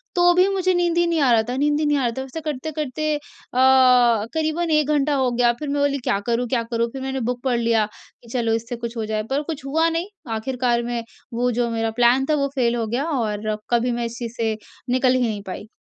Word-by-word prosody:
तो 350 0 +5
भी 365 +2 +4
मुझे 370 -1 +1
नींद 345 -1 +1
ही 345 - +4
नहीं 335 -1 +1
आ 265 -3 +4
रहा 225 -2 +4
था 250 - -2
नींद 295 +1 +2
ही 310 - +1
नहीं 295 -1 +2
आ 265 - 0
रहा 235 - +1
था। 265 - -2
ऐसा 270 +5 -7
करते-करते 305 +1 -2
अ, - - -3 1.1
क़रीबन 320 +1 -1
1 305 -2 +3
घंटा 295 -1 +2
हो 260 -2 +1
गया। 240 0 +3
फिर 300 - -4
मैं 285 0 0
बोली, 285 0 +2
“क्या 200 - +1
करूँ, 240 +1 0
क्या 235 -1 0
करूँ?” 230 0 +1
फिर 270 - -6
मैंने 265 0 -3
बुक 245 -1 -3
पढ़ 255 -3 +1
लिया 230 -2 +2 0.4
कि 235 - -15
चलो 230 -3 +1
इससे 230 +2 -3
कुछ 235 0 -6
हो 220 - -2
जाए, 215 0 -2
पर 275 +2 0
कुछ 300 -3 -6
हुआ 320 +4 +2
नहीं। 330 +3 -2 0.3
आख़िरकार 240 +1 0
में 240 -1 -3 0.3
वो 245 +1 +1
जो 240 0 0
मेरा 225 -1 -1
प्लान 245 +3 +5
था, 305 - +4
वो 280 -1 +1
फ़ेल 240 -3 +2
हो 230 -1 -1
गया, 245 +6 -1
और 215 -8 -1
कभी 240 +1 +2
मैं 240 0 -2
इस 230 0 -6
चीज़ 235 -2 -5
से 225 -1 0 0.3
निकल 255 0 +3
ही 255 - +1
नहीं 210 -2 -3
पाई। 190 +3 -6
255 Hz, 250 wpm, -22 LUFS, 235-295 Hz, 1.1 s, तो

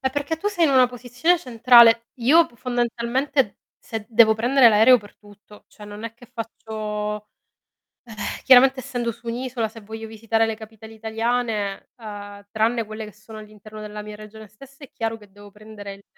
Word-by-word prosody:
eh 265 -1 -1
perché 290 +3 -3
tu 400 +6 -2
sei 350 -5 +1
in 285 - +1
una 255 -2 +5
posizione 250 +8 0
centrale. 235 -3 +5
Io 320 +8 +5
p - - -23
fondamentalmente 245 0 -1 0.2
se 220 -2 -7
devo 225 -1 +5
prendere 245 +3 +5
l'aereo 225 +4 +6
per 205 -2 -16
tutto, 205 0 -18
cioè 210 - -14
non 205 +1 -9
è 230 - -5
che 245 +1 -17
faccio 210 -2 -5 0.8
eh, 235 - -13 0.3
chiaramente 265 +1 +6
essendo 245 -3 -3
su 235 +2 -20
un'isola 240 -1 -3
se 225 +1 -13
voglio 220 +1 -8
visitare 225 +1 0
le 225 -1 -3
capitali 220 0 -13
italiane, 220 -2 -2
uhm, 205 -2 -10
tranne 225 +2 0
quelle 215 0 -7
che 210 - -12
sono 215 +1 -13
all'interno 215 0 -12
della 210 0 -7
mia 210 0 -9
regione 215 0 -12
stessa 275 +7 -15
è - - -16
chiaro 225 -1 -3
che 210 -2 -18
devo 205 +1 -15
prendere 210 -1 -11
il 200 0 -18
225 Hz, 180 wpm, -22 LUFS, 210-245 Hz, 0.8 s, l'aereo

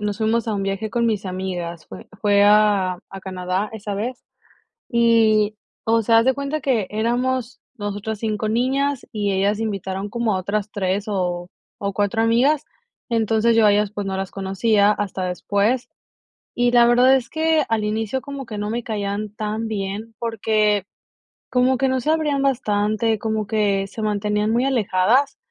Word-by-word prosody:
nos 210 -1 -2
fuimos 225 +1 0
a 215 - 0
un 200 - -2
viaje 195 +2 -2
con 235 +2 0
mis 215 -4 0
amigas, 180 -3 -5
fue - - -11
fue 205 -2 +4
a 205 -3 +4
a 195 0 -8
Canadá 185 +2 -3
esa 205 -2 -5
vez. 240 +5 -4 0.7
Y, 225 -3 +3 0.3
o 225 0 +2
sea, 225 +1 +4
haz 230 - +1
de 265 - +4
cuenta 280 +3 -3
que 240 -9 0
éramos 245 +3 -1 0.2
nosotras 205 0 -4
5 215 -1 -2
niñas, 265 +4 0
y 205 -2 -1
ellas 200 +2 +1
se 225 - -2
invitaron 195 -1 -3
como 230 -2 0
a - - -1
otras 205 +2 -2
3, 195 0 -1
o 180 -3 -2 0.3
o 200 -1 -2
4 205 +3 0
amigas. 265 +7 +3 0.5
Entonces, 225 0 +2
yo 225 -2 +5
a - - +6
ellas, 205 0 +1
pues, 205 -2 -4
no 190 0 -2
las 190 -1 -4
conocía 200 +2 +2
hasta 195 -3 -2
después. 205 +7 0 0.7
Y 245 0 +2
la 240 -1 +6
verdad 250 +2 +5
es 245 -3 -2
que 315 -1 +2
al 220 -2 0
inicio 220 +4 -1
como 280 -1 -7
que 215 -2 -7
no 205 0 -3
me 235 +2 -2
caían 205 -1 -3
tan 215 +1 -3
bien, 210 +2 -4
porque 215 -3 +1 0.7
como 255 +1 +2
que 270 +2 +1
no 260 0 0
se 300 - +1
abrían 300 -3 +1
bastante, 220 -4 +1
como 220 -1 -2
que 200 -3 +1
se 220 - -8
mantenían 210 0 0
muy 240 +3 +2
alejadas. 245 +2 +2
215 Hz, 175 wpm, -21 LUFS, 200-235 Hz, 0.7 s, a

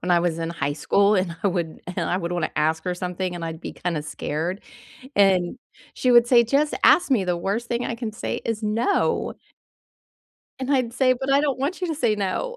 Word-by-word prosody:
when 180 - -3
I 175 - +4
was 170 -2 -1
in 165 0 -3
high 145 -4 -2
school, 200 +6 +3
and 180 -3 -1
I 200 - +3
would 170 -4 -3 0.2
and - - -1
I 180 - +1
would 170 -2 -3
wanna 175 -3 -1
ask 160 +1 0
her 180 - -1
something, 180 0 -3
and 170 -1 -5
I'd 165 -1 -6
be - - -6
kinda 170 -4 -3
scared, 155 +5 -3 0.6
and 190 0 +3 0.4
she 255 - 0
would 240 -1 +7
say, 240 -2 +6
"Just 280 +6 +1
ask 350 - +5
me, 230 -7 +3
the 180 -1 -1
worst 205 +7 -2
thing 240 +1 -1
I - - -2
can 230 -2 -4
say 215 - -4
is 225 -1 -3
'No'." 225 - 0 1.3
And 265 +2 -1
I'd 250 -3 0
say, 255 +1 +3
"But 270 +1 -1
I 280 - +5
don't 285 -3 0
want 295 +8 -2
you 360 - -1
to 320 - -1
say 240 -7 +1
no." 205 - -2
195 Hz, 225 wpm, -23 LUFS, 175-245 Hz, 1.3 s, would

